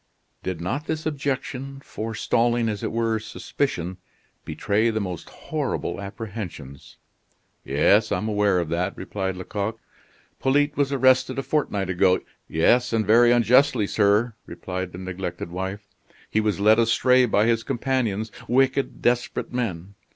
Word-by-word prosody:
Did 90 Hz, -3 st, -4 dB
not 135 Hz, -, -3 dB
this 155 Hz, 0 st, -3 dB
objection, 135 Hz, -2 st, -3 dB
forestalling, 115 Hz, +1 st, 0 dB
as 105 Hz, -2 st, -3 dB
it -, -, -2 dB
were, 115 Hz, -1 st, 0 dB
suspicion, 105 Hz, -, -3 dB, 0.5 s
betray 110 Hz, +3 st, 0 dB
the 110 Hz, -1 st, -1 dB
most 90 Hz, -5 st, -5 dB
horrible -, -, -3 dB
apprehensions? 100 Hz, -, -8 dB, 0.7 s
"Yes, 110 Hz, +3 st, +3 dB
I -, -, +2 dB
am 110 Hz, -, -3 dB
aware 105 Hz, -3 st, +2 dB
of 85 Hz, -3 st, -1 dB
that," 85 Hz, +2 st, -1 dB
replied 95 Hz, -2 st, -3 dB
Lecoq. 105 Hz, +4 st, -4 dB, 0.6 s
"Polyte 145 Hz, +2 st, +2 dB
was 140 Hz, -1 st, +1 dB
arrested 130 Hz, -1 st, +3 dB
a 135 Hz, -, -1 dB
fortnight 115 Hz, -9 st, -1 dB
ago 90 Hz, 0 st, +3 dB, 0.2 s
" -, -, -46 dB
"Yes, 120 Hz, +10 st, +2 dB
and 110 Hz, -1 st, +1 dB
very 120 Hz, +3 st, +6 dB
unjustly, 120 Hz, 0 st, +4 dB
sir," 105 Hz, +3 st, +2 dB
replied 90 Hz, +1 st, -5 dB
the 90 Hz, -, -9 dB
neglected 90 Hz, -2 st, -5 dB
wife. 95 Hz, +3 st, -5 dB, 0.4 s
"He 110 Hz, -, +2 dB
was 105 Hz, -2 st, 0 dB
led 110 Hz, +2 st, +5 dB
astray 125 Hz, +2 st, +4 dB
by 105 Hz, -1 st, +3 dB
his 115 Hz, -1 st, +2 dB
companions, 115 Hz, -4 st, -1 dB, 0.2 s
wicked, 135 Hz, +2 st, +1 dB
desperate 120 Hz, 0 st, 0 dB
men. 100 Hz, -6 st, -3 dB
110 Hz, 145 wpm, -24 LUFS, 95-125 Hz, 0.7 s, very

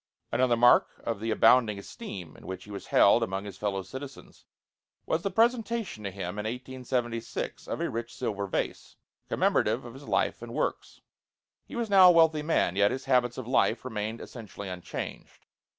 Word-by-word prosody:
Another 125 Hz, -2 st, +2 dB
mark 120 Hz, +1 st, +5 dB
of 115 Hz, -3 st, -2 dB
the 115 Hz, +2 st, -3 dB
abounding 115 Hz, -1 st, +4 dB
esteem 100 Hz, -, -8 dB
in -, -, -14 dB
which 95 Hz, 0 st, -6 dB
he 105 Hz, -, -12 dB
was 100 Hz, -, -7 dB
held -, -, +5 dB
among 95 Hz, +2 st, -2 dB
his 100 Hz, -2 st, -9 dB
fellow 100 Hz, -2 st, -1 dB
citizens 130 Hz, +5 st, -10 dB, 0.6 s
was 160 Hz, -, 0 dB
the 195 Hz, -, -1 dB
presentation 225 Hz, -, 0 dB
to 100 Hz, -, -2 dB
him 95 Hz, +1 st, -5 dB
in 105 Hz, -, -4 dB
1876 125 Hz, -1 st, -4 dB
of -, -, -3 dB
a -, -, 0 dB
rich 115 Hz, +1 st, -4 dB
silver 100 Hz, -2 st, -3 dB
vase, -, -, -3 dB, 0.3 s
commemorative 115 Hz, +4 st, +1 dB
of 120 Hz, -, -9 dB
his 140 Hz, +2 st, -12 dB
life -, -, 0 dB
and -, -, -8 dB
works. -, -, -3 dB, 0.7 s
He -, -, -9 dB
was 235 Hz, -1 st, -1 dB
now 190 Hz, -2 st, +9 dB
a -, -, +7 dB
wealthy 160 Hz, -2 st, +4 dB
man; 150 Hz, -, +1 dB
yet 100 Hz, +1 st, +4 dB
his 130 Hz, -, -4 dB
habits 125 Hz, -2 st, +2 dB
of 130 Hz, -3 st, -6 dB
life 130 Hz, -, +2 dB
remained 110 Hz, -1 st, -4 dB
essentially 105 Hz, -4 st, -9 dB
unchanged. 90 Hz, -1 st, -7 dB
120 Hz, 180 wpm, -28 LUFS, 100-135 Hz, 0.7 s, now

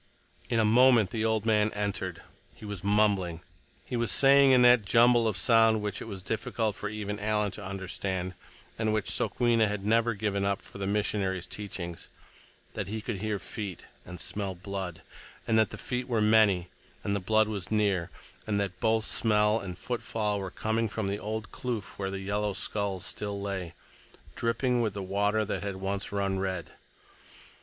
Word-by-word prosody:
In 115 Hz, -, +2 dB
a 110 Hz, -, +4 dB
moment 120 Hz, -2 st, +5 dB
the 110 Hz, -1 st, -1 dB
old 110 Hz, -1 st, +1 dB
man 105 Hz, -1 st, +3 dB
entered. 100 Hz, -4 st, -3 dB, 0.3 s
He -, -, -11 dB
was 100 Hz, -3 st, -6 dB
mumbling. 100 Hz, -5 st, +2 dB, 0.4 s
He -, -, -4 dB
was 120 Hz, -2 st, 0 dB
saying, 140 Hz, 0 st, +6 dB
in 125 Hz, -1 st, +6 dB
that 120 Hz, -2 st, +7 dB
jumble 115 Hz, +3 st, +5 dB
of 105 Hz, -3 st, -1 dB
sound 115 Hz, -2 st, +4 dB
which 105 Hz, -1 st, -3 dB
it -, -, -5 dB
was 95 Hz, -4 st, -7 dB
difficult 110 Hz, 0 st, -2 dB
for 105 Hz, -, -4 dB
even 105 Hz, -1 st, -4 dB
Alan 105 Hz, -1 st, 0 dB
to 105 Hz, -, -8 dB
understand—and 95 Hz, +3 st, -4 dB
which 110 Hz, -2 st, 0 dB
Sokwenna 115 Hz, -3 st, +2 dB
had 105 Hz, -1 st, -4 dB
never 115 Hz, +1 st, +2 dB
given 100 Hz, -1 st, -1 dB
up 100 Hz, -1 st, 0 dB
for -, -, -12 dB
the 100 Hz, -, -2 dB
missionaries' 100 Hz, -3 st, 0 dB
teachings—that 90 Hz, -5 st, -9 dB
he 110 Hz, +2 st, -3 dB
could 110 Hz, -1 st, -4 dB
hear 105 Hz, +1 st, -2 dB
feet 100 Hz, -2 st, -6 dB, 0.2 s
and 90 Hz, 0 st, -9 dB
smell 95 Hz, +2 st, -2 dB
blood; 95 Hz, -2 st, -6 dB, 0.4 s
and 115 Hz, -, +1 dB
that 110 Hz, -, +3 dB
the -, -, -7 dB
feet 125 Hz, 0 st, -3 dB
were 120 Hz, -3 st, +1 dB
many, 105 Hz, -5 st, +4 dB, 0.3 s
and 100 Hz, -, 0 dB
the -, -, 0 dB
blood 110 Hz, +3 st, +3 dB
was 100 Hz, -4 st, -4 dB
near, 100 Hz, -5 st, +1 dB, 0.4 s
and 105 Hz, -2 st, +1 dB
that 95 Hz, -2 st, -3 dB
both 110 Hz, 0 st, +2 dB
smell 105 Hz, 0 st, +3 dB
and 95 Hz, -4 st, -7 dB
footfall 110 Hz, -4 st, -2 dB
were 95 Hz, -1 st, -4 dB
coming 110 Hz, +3 st, -1 dB
from 105 Hz, -1 st, -2 dB
the 100 Hz, +1 st, -2 dB
old 110 Hz, 0 st, -4 dB
kloof 120 Hz, -6 st, -5 dB
where 95 Hz, -1 st, -1 dB
yellow 100 Hz, +1 st, -1 dB
skulls 100 Hz, -2 st, -2 dB
still 100 Hz, -1 st, -3 dB
lay, 95 Hz, -4 st, -4 dB, 0.6 s
dripping 120 Hz, +1 st, +1 dB
with 110 Hz, -4 st, -1 dB
the 100 Hz, -, -4 dB
water 105 Hz, +3 st, +1 dB
that 105 Hz, -, -3 dB
had 100 Hz, -1 st, -3 dB
once 95 Hz, +1 st, -3 dB
run 100 Hz, -1 st, -1 dB
red. 95 Hz, -3 st, -3 dB
105 Hz, 175 wpm, -29 LUFS, 95-110 Hz, 0.6 s, that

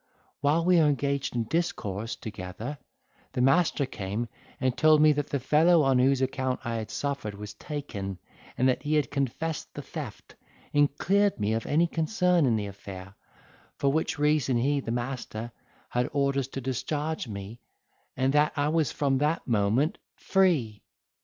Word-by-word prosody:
While 150 Hz, +4 st, +2 dB
we 180 Hz, 0 st, +5 dB
were 155 Hz, -, +5 dB
engaged 140 Hz, -2 st, 0 dB
in 120 Hz, -, +1 dB
discourse 115 Hz, -, -2 dB
together, 110 Hz, +6 st, -7 dB, 0.5 s
the 125 Hz, -, 0 dB
master 140 Hz, +2 st, +3 dB
came 110 Hz, 0 st, -4 dB, 0.3 s
and 130 Hz, -1 st, +1 dB
told 155 Hz, -1 st, +5 dB
me, 155 Hz, 0 st, +7 dB
that 145 Hz, -1 st, -1 dB
the 140 Hz, -, -1 dB
fellow 155 Hz, +5 st, +4 dB
on 135 Hz, -2 st, +3 dB
whose 135 Hz, +1 st, +3 dB
account 130 Hz, -1 st, -1 dB
I 115 Hz, -1 st, -1 dB
had 110 Hz, -1 st, -5 dB
suffered 140 Hz, -8 st, -3 dB
was 105 Hz, 0 st, -8 dB
taken, 105 Hz, -7 st, -5 dB, 0.4 s
that 130 Hz, 0 st, +2 dB
he 150 Hz, +1 st, 0 dB
had 150 Hz, -5 st, +1 dB
confessed 140 Hz, +3 st, -2 dB
the -, -, -6 dB
theft, -, -, -8 dB, 0.4 s
and 145 Hz, -1 st, +3 dB
cleared 200 Hz, -, +2 dB
me 105 Hz, +1 st, +1 dB
of 115 Hz, 0 st, -2 dB
any 160 Hz, +4 st, +3 dB
concern 175 Hz, -1 st, +2 dB
in 115 Hz, -, +3 dB
the 105 Hz, -2 st, -1 dB
affair; 100 Hz, -1 st, -9 dB, 0.6 s
for 140 Hz, -, +2 dB
which 160 Hz, +1 st, 0 dB
reason 145 Hz, -4 st, +2 dB
he, 140 Hz, +4 st, +2 dB
the 130 Hz, -, -6 dB
master, 120 Hz, -1 st, -4 dB, 0.4 s
had 125 Hz, 0 st, 0 dB
orders 140 Hz, -2 st, +1 dB
to 135 Hz, 0 st, -6 dB
discharge 145 Hz, +4 st, -2 dB
me, 100 Hz, +2 st, -7 dB, 0.6 s
and 130 Hz, +1 st, +2 dB
that 150 Hz, +1 st, +3 dB
I 145 Hz, 0 st, +1 dB
was 160 Hz, -2 st, +1 dB
from 135 Hz, -2 st, +1 dB
that 150 Hz, +3 st, 0 dB
moment 115 Hz, -, +1 dB, 0.2 s
free. 155 Hz, -, +1 dB
135 Hz, 165 wpm, -28 LUFS, 115-150 Hz, 0.6 s, me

